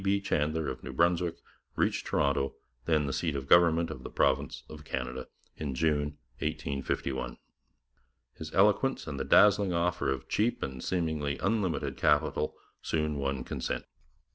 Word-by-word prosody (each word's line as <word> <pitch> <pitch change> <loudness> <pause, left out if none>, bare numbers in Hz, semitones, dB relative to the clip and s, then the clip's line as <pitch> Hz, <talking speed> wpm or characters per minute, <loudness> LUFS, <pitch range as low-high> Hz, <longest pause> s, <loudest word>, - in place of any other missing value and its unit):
B. 100 +1 +2
Chandler 80 -5 0
of - - -4
New 65 - -6
Brunswick 85 +3 +2 0.4
reached - - 0
Toronto, 70 -2 +1 0.3
then 80 -3 +2
the 70 - -2
seat 80 -1 -1
of 70 -1 -3
government 85 -1 +5
of - - -7
the - - -7
province - - +1
of 75 -1 -10
Canada, 65 -3 -4 0.3
in 70 -4 -3
June 75 0 0 0.2
1851. 65 -2 -2 1.0
His 80 -1 -8
eloquence 105 +7 +3
and 70 -3 -5
the - - 0
dazzling 100 -2 +5
offer 85 -3 0
of 65 -2 -2
cheap 115 +3 0
and 65 -1 -5
seemingly 80 -6 -1
unlimited 100 -4 -1
capital 75 0 +2 0.3
soon 75 -2 -1
won 70 -2 -1
consent. - - -3
75 Hz, 145 wpm, -30 LUFS, 70-85 Hz, 1.0 s, government